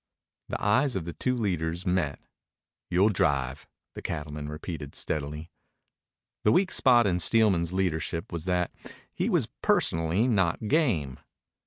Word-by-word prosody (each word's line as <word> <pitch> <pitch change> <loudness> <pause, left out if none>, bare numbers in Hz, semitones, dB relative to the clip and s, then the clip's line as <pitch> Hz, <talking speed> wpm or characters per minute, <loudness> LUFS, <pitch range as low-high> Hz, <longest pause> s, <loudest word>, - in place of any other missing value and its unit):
The - - -3
eyes 125 +6 +2
of 90 -4 -2
the 85 - -5
two 125 -1 -1
leaders 85 -5 -1
met. 90 -6 0 0.7
"You'll 95 +4 +4
drive," 70 -8 0 0.3
the - - -8
cattleman 75 -1 -5
repeated 75 -2 -6
steadily. 75 +2 -3 0.9
The 105 - +3
weak 185 - +3
spot 120 -3 +5
in 90 -3 +1
Steelman's 90 -4 +3
leadership 85 -3 -2
was 85 -1 -4
that 90 -2 0 0.4
he - - -1
was - - +2 0.2
personally 85 +8 +2
not 100 -2 +1
game. 105 - +1
85 Hz, 135 wpm, -27 LUFS, 80-105 Hz, 0.9 s, spot